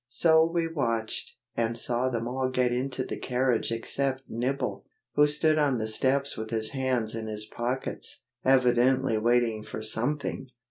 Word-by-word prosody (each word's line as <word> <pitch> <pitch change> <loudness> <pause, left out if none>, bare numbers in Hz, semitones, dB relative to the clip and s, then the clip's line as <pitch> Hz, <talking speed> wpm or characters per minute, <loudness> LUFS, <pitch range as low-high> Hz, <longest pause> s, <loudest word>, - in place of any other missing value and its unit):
So 160 +3 +5
we 165 0 0
watched, 115 -8 -2 0.2
and 115 0 0
saw 125 +2 +1
them 115 -2 -2
all 130 +1 -1
get 125 -1 +1
into 130 +1 -2
the - - -5
carriage 125 -2 0
except 130 +3 0
Nibble, 130 +4 -2 0.3
who 150 0 +5
stood 155 +1 +2
on 140 -4 +2
the 110 -1 -2
steps 135 +5 +1
with 110 0 -5
his 110 -1 -1
hands 130 -5 -1
in 110 -1 -4
his 105 -1 -2
pockets, 120 +4 -3 0.2
evidently 130 -1 +3
waiting 120 -1 +2
for 110 0 -7
something. 130 +4 0
125 Hz, 155 wpm, -27 LUFS, 115-135 Hz, 0.3 s, So